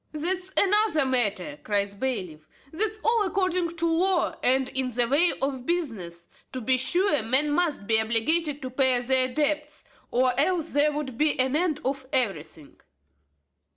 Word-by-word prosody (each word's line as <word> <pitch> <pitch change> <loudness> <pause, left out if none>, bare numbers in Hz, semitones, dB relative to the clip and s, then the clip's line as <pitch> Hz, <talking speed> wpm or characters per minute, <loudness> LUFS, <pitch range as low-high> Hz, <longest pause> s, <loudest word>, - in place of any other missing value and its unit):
"That's 365 +4 +1
another 400 -6 +3
matter," 260 +3 -1
cries 200 -1 0
the 200 - -15
bailiff; 185 -12 -4 0.2
"that's 430 +5 0
all 460 0 +2
according 365 -3 -1
to 335 - -1
law, 345 +2 +1
and 260 +1 +1
in 260 -1 -1
the 240 0 0
way 305 +7 +3
of 265 -2 -3
business. 200 - -4 0.3
To 260 - -4
be 255 +2 +1
sure, 345 - +2
men 265 +7 +1
must 300 -8 -1
be 220 +1 +3
obliged 275 +7 0
to 260 - -4
pay 260 -1 +3
their 255 +1 +1
debts, 300 +1 -2 0.3
or 255 0 +1
else 335 +1 0
there 290 +1 +2
would 285 -5 -6
be 305 -2 +1
an 260 +2 +1
end 315 -2 -1
of 265 0 -3
everything." 165 - -3
275 Hz, 160 wpm, -25 LUFS, 245-330 Hz, 0.3 s, another